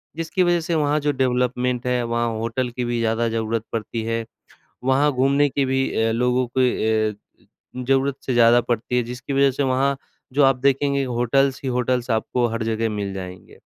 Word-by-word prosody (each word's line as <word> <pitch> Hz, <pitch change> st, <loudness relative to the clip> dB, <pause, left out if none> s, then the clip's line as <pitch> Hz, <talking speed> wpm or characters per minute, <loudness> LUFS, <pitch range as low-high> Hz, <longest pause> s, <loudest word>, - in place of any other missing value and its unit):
जिसकी 165 Hz, +3 st, 0 dB
वजह 175 Hz, -1 st, +2 dB
से 165 Hz, +1 st, -2 dB
वहाँ 150 Hz, -1 st, +1 dB
जो 145 Hz, 0 st, 0 dB
डेवलपमेंट 125 Hz, 0 st, 0 dB
है, 125 Hz, -1 st, +1 dB
वहाँ 120 Hz, 0 st, -1 dB
होटल 115 Hz, +3 st, -2 dB
की 120 Hz, +1 st, -4 dB
भी 120 Hz, 0 st, -1 dB
ज़्यादा 115 Hz, 0 st, 0 dB
ज़रूरत 115 Hz, 0 st, -2 dB
पड़ती 115 Hz, 0 st, -3 dB
है। 115 Hz, 0 st, -2 dB, 0.6 s
वहाँ 135 Hz, +3 st, +3 dB
घूमने 140 Hz, +2 st, +2 dB
की 140 Hz, 0 st, 0 dB
भी 130 Hz, 0 st, 0 dB
अ, 115 Hz, -, +1 dB
लोगों 125 Hz, +2 st, +1 dB
के 110 Hz, -4 st, +2 dB
अ, -, -, -11 dB, 0.6 s
ज़रूरत 135 Hz, +2 st, +1 dB
से 130 Hz, -, -1 dB
ज़्यादा 120 Hz, 0 st, +6 dB
पड़ती 120 Hz, +1 st, -2 dB
है, 125 Hz, -, +2 dB
जिसकी 125 Hz, +4 st, -6 dB
वजह 135 Hz, 0 st, +4 dB
से 140 Hz, +2 st, -2 dB
वहाँ 135 Hz, +1 st, +1 dB, 0.4 s
जो 145 Hz, +2 st, +3 dB
आप 135 Hz, -1 st, +5 dB
देखेंगे, 140 Hz, 0 st, +2 dB
होटल्स 130 Hz, +2 st, +1 dB
ही 135 Hz, -, -1 dB
होटल्स 125 Hz, 0 st, -1 dB
आपको 115 Hz, +2 st, 0 dB
हर 115 Hz, 0 st, -3 dB
जगह 115 Hz, 0 st, -1 dB
मिल 100 Hz, -2 st, -4 dB
जाएँगे। 90 Hz, -1 st, -9 dB
125 Hz, 190 wpm, -22 LUFS, 115-135 Hz, 0.6 s, ज़्यादा